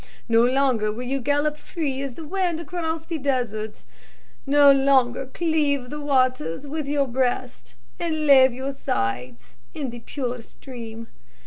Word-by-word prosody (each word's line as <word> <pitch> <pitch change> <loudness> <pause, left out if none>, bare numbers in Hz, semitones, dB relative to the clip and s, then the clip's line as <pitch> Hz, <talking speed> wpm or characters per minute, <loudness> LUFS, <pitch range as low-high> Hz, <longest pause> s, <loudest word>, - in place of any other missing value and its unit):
No 230 0 +4
longer 250 -4 +2
will 235 +4 -6
you 270 +2 -1
gallop 290 +3 0
free 285 -5 -3
as 275 -3 -5
the 325 - -8
wind 355 -1 -1
across 325 -1 -3
the 330 -2 -4
desert; 240 -6 -2 0.6
no 285 0 +7
longer 270 -2 +3
cleave 290 -4 0
the 295 0 -5
waters 255 - +1
with 295 0 -4
your 285 -1 +1
breast, 245 - -2 0.2
and 315 -2 -1
lave 265 -2 +7
your 260 +3 -4
sides 125 - -3 0.2
in 275 -5 -3
the 240 - -8
pure 245 -1 -4
stream. 230 -2 -10
270 Hz, 145 wpm, -24 LUFS, 240-290 Hz, 0.6 s, no